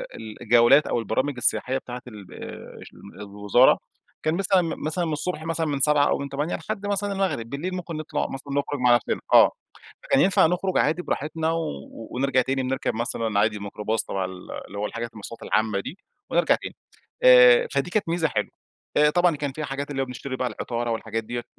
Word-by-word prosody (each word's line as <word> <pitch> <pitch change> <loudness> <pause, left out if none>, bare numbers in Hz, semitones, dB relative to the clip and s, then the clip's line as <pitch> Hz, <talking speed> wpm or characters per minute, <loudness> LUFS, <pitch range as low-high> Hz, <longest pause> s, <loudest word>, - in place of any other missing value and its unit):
ال 110 0 -9
الجولات 120 +5 +5
أو - - 0
البرامج 130 +6 -1
السياحية 130 +2 +1
بتاعة 125 -1 -7
ال 105 -6 -11
ال - - -11
الوزارة. 105 +5 +3 0.5
كان 155 +1 +1
مثلًا 190 0 +3 0.2
مثلًا 170 +3 -1
من 160 - -2
الصبح 155 +1 -3
مثلًا 165 0 -1
من 145 -2 -1
07:00 145 +1 +4
أو - - +1
من 140 0 -5
08:00 145 +5 -2
لحد 205 +4 -5
مثلًا 205 0 -1
المغرب. 190 -13 -2
بالليل 170 +8 -4
ممكن 170 -3 -5
نطلع 155 - -3
مثلًا 140 +1 -7
نخرج 140 0 -1
مع 125 -1 +5
نفسنا 120 - -1
آه. - - +8 0.5
فكان 135 - +3
ينفع 190 -1 +4
نخرج 180 +2 -1
عادي 160 +4 +2
براحتنا 160 +1 -2
و 165 0 -1 0.4
ونرجع 130 0 +1
تاني 135 +1 -1
بنركب 130 -3 -2
مثلًا 115 -2 -1
عادي 105 0 +2
الميكروباص 105 +2 -2
تبع 95 -1 -2
ال 90 0 -9 0.2
اللي 100 - -9
هو 105 - -1
الحاجة 115 +2 -4
المواصلات 110 +2 -9
العامة 110 -2 +1
دي، 145 - -7 0.3
ونرجع - - +3
تاني. - - -8 0.5
آآ، - - +8
فدي - - -1
كانت 200 -3 -1
ميزة 165 -1 +1
حلوة. - - -2 0.5
آآ، 150 0 +6
طبعًا 175 0 +3
كان 145 -2 -3
فيها 155 +2 -5
حاجات 140 +1 -5
اللي 135 -1 -2
هو - - 0
بنشتري 130 +1 -6
بقى 130 -1 -1
العطارة 120 +1 -3
والحاجات 115 0 -3
ديّة، 120 +2 -5
140 Hz, 195 wpm, -24 LUFS, 115-165 Hz, 0.5 s, آه